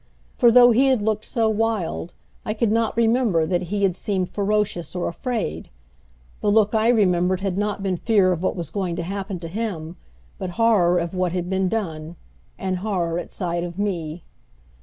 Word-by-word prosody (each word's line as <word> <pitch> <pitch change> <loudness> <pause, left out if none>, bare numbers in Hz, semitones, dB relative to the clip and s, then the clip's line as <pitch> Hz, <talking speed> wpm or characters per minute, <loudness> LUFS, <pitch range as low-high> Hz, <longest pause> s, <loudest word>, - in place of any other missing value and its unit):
For 240 - +5
though 245 +1 +7
he 260 +4 +4
had 255 -6 +2
looked 215 0 -1
so 230 -3 0
wild 220 -6 -1 0.3
I 215 - -3
could 220 -1 +1
not 225 0 0
remember 225 -7 +2
that 175 +2 0
he 200 0 -1
had 190 -3 +2
seemed 190 -2 -2
ferocious 205 -4 -1
or 180 - -1
afraid. 170 - -3 0.7
The 210 - 0
look 210 0 +3
I 220 0 +2
remembered 185 -5 +2
had 195 -2 -1
not 205 0 -2
been 190 -2 0
fear 200 -2 +3
of 175 -2 -2
what 185 - 0
was 170 -4 -5
going 180 -2 -2
to 170 - -3
happen 195 +1 -4
to 165 - -5
him, 180 -4 -4 0.4
but 185 - -3
horror 205 -7 +4
of 170 0 -2
what 180 -2 -1
had 180 0 -3
been 190 -1 +1
done 165 -7 -4 0.4
and 185 -1 -2
horror 180 -4 -1
at - - -7
sight 175 -2 -3
of 175 0 -6
me. 175 -5 -3
190 Hz, 190 wpm, -23 LUFS, 175-220 Hz, 0.7 s, though